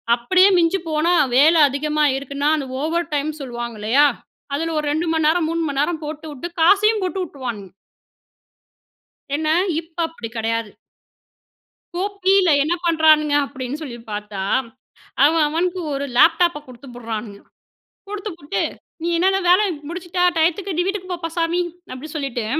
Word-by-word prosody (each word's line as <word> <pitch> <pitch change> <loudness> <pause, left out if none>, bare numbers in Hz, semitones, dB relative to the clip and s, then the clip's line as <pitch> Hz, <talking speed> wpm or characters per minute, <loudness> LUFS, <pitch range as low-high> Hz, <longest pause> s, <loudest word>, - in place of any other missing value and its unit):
அப்பிடியே 370 +12 +4
மிஞ்சி 345 +3 +2
போனா, 315 +3 +1 0.2
வேலை 315 +4 +6
அதிகமா 300 +2 0
இருக்குன்னா, 280 +2 -2
அந்த 280 -3 -4
ஓவர் 335 +2 -2
டைம் 295 +1 0
சொல்லுவாங்க. 240 -3 -6
இல்லையா. 260 +8 +4 0.5
அதுல 325 +2 -2
ஒரு 300 - -3
2 320 +3 -1
மணி 320 -1 +1
நேரம், 320 0 +2
3 335 0 -1
மணி 275 -1 -2
நேரம் 320 +1 -1
போட்டுவுட்டு, 305 0 -6
காசையும் 415 +5 +4
போட்டு 370 +1 -2
விட்டுருவானுங்க 240 - -7 1.6
ஏன்னா, 310 +1 0 0.3
இப்போ 335 +1 -7
அப்பிடி 240 -9 -8
கிடையாது. 225 0 -1 1.3
கோ 360 - -1 0.2
பில 385 -2 +4
என்ன 315 +4 0
பண்ணுறானுங்க 310 -3 +4
அப்பிடின்னு 265 +1 -6
சொல்லி 250 -6 -7
பார்த்தா, 205 -1 -5 0.8
அவன் 315 +1 +4
அவனுக்கு 355 +4 -1
ஒரு 280 0 -2
லேப்டாப்ப 335 +2 +4
குடுத்து 255 +2 -13
புடுறானுங்க. 220 -3 -6 0.7
குடுத்து 415 +1 -5
புட்டு, 290 +4 -3 0.4
"நீ 335 - -2
என்னன்ன 380 +3 +2
வேலை 370 +4 +6 0.3
முடிச்சுட்டா, 355 +1 -2
டையத்துக்கு 350 +3 0
நீ - - +3
வீட்டுக்கு 380 -2 -4
போப்பா 340 -1 -4
சாமி" 335 +2 +1 0.3
அப்படி 255 +5 -8
சொல்லிட்டு 265 -6 -3
310 Hz, 140 wpm, -20 LUFS, 275-345 Hz, 1.6 s, வேலை